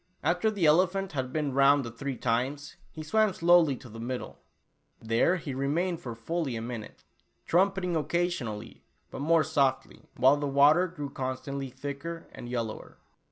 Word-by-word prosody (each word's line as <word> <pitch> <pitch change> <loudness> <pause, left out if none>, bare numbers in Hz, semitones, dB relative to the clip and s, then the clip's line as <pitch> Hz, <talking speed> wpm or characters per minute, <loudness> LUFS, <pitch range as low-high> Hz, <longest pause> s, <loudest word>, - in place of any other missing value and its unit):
After 180 +7 +2
the 200 -6 0
elephant 185 +5 +3
had 130 -3 -3
been 150 -2 -1
round 140 0 +4
the 115 - -6
three 130 +2 -5
times, 135 +5 -2 0.2
he 155 - -8
swam 215 +5 +2
slowly 170 -5 +4
to 130 +1 -12
the 115 0 -10
middle. 125 +2 -5 0.6
There 115 +10 +2
he 160 -6 -5
remained 160 +6 -1
for 120 -3 -6
fully 140 +3 -3
a - - -3
minute, 115 -2 -7 0.4
trumpeting 185 0 +1
occasionally, 150 - -2 0.3
but - - -6
more 160 +2 +4
softly, 140 -2 -1
while 135 +3 +5
the 145 0 -2
water 145 +6 +5
grew 145 -5 -7
constantly 135 +1 -4
thicker 145 +6 -6
and 120 - -9
yellower. 115 -3 -5
145 Hz, 160 wpm, -28 LUFS, 130-170 Hz, 0.6 s, while